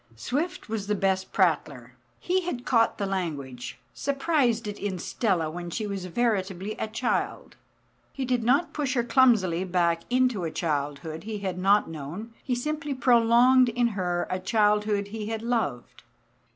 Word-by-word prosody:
Swift 285 - -3
was 215 -3 -3
the 210 - +1
best 190 -1 0
prattler. 145 - 0 0.3
He 370 +1 +1
had 335 -9 -4
caught 230 -2 +3
the 200 - -1
language, 150 -10 -4 0.2
surprised 275 -5 +1
it 205 - -5
in 200 -2 -3
Stella 180 -3 0
when 175 +1 -6
she 215 +5 -3
was 200 -3 -4
veritably 195 -2 -1
a - - -1
child. 225 +3 -2 0.6
He 270 - -4
did 245 -2 0
not 275 +9 +2
push 280 -3 -1
her 240 - +2
clumsily 220 -9 +3
back 175 -2 +1
into 250 -6 +2
a 165 - -1
childhood 155 +1 -3
he 220 -1 -4
had 190 -3 -4
not 200 +3 +4
known; 165 +9 -7
he 250 - -1
simply 290 +2 -3
prolonged 245 +1 +5
in 240 +1 +1
her 180 -4 -1
a 185 - -1
childhood 210 0 +1
he 215 0 -5
had 225 0 -4
loved. 230 - -2
210 Hz, 160 wpm, -26 LUFS, 180-245 Hz, 0.6 s, prolonged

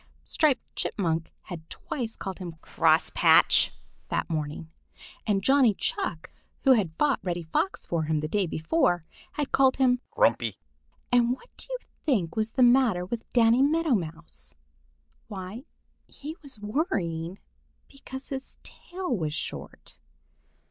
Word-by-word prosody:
Striped 300 -5 +1
Chipmunk 165 -4 -1
had 165 -3 -9
twice 235 -6 -5
called 190 0 -6
him 175 -3 -6
"Cross - - +2
Patch" - - +6 0.4
that - - -1
morning, 155 +1 -3 0.6
and 195 -2 +1
Johnny 265 -5 +5
Chuck, 165 -3 -3 0.3
who 270 - +6
had 195 -10 +3
fought 295 -2 +2
Reddy 175 -2 -2
Fox 165 +4 -1
for 165 -2 -1
him 155 0 +1
the 155 - -2
day 195 +2 0
before, 175 - +1 0.3
had 295 -2 -2
called 265 -1 +4
him 250 -2 +3
"Grumpy." - - +2 0.6
And 245 -1 +4
what 370 - -13
do - - -7
you - - -2 0.3
think 200 - +1
was 220 0 0
the 255 - +4
matter 240 -7 +4
with 230 +4 -6
Danny 235 +1 +5
Meadow 315 +1 +3
Mouse? 160 - -4 0.7
Why, 205 +4 -7 0.4
he 305 +3 -8
was 275 -6 -10
worrying 195 - -2 0.5
because 270 -1 -9
his 270 -1 -6
tail 350 - -4
is 150 -1 -2
short. - - -7
215 Hz, 140 wpm, -27 LUFS, 170-265 Hz, 0.7 s, Patch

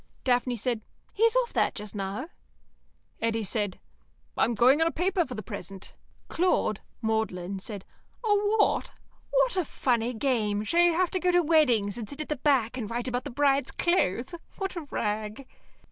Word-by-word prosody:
Daphne 245 -1 +1
said, 235 0 -1 0.3
"He's 455 +3 +3
off - - +1
that - - +1
just 210 -1 -6
now." 205 - -4 0.9
Eddy 225 -1 0
said, 205 -1 -2 0.6
"I'm 235 - +2
going 255 +8 +5
on 325 - +4
a - - 0
paper 360 +2 +1
for 250 - -6
the 215 - -6
present." 195 -1 -8 0.3
Claude 325 - +1 0.2
(Magdalen) 200 -4 -1
said, 200 0 -7 0.4
"A 445 - -1
what? 415 +1 +2 0.4
What - - +2
a 370 - +2
funny 245 -5 0
game! 215 -5 0
Shall 335 +11 +3
you 345 -1 +5
have 360 +1 +1
to 370 - 0
go 360 - +1
to 355 0 +4
weddings 245 -10 +3
and 215 -3 -6
sit 285 - -9
at 305 - -6
the 300 - -1
back 260 -4 +2
and 215 -4 -4
write 240 +2 -3
about 250 0 -2
the - - -4
bride's 275 0 +2
clothes? 260 - +1 0.2
What 385 -1 -3
a 330 -4 -6
rag!" 215 +4 -3
250 Hz, 175 wpm, -28 LUFS, 215-335 Hz, 0.9 s, going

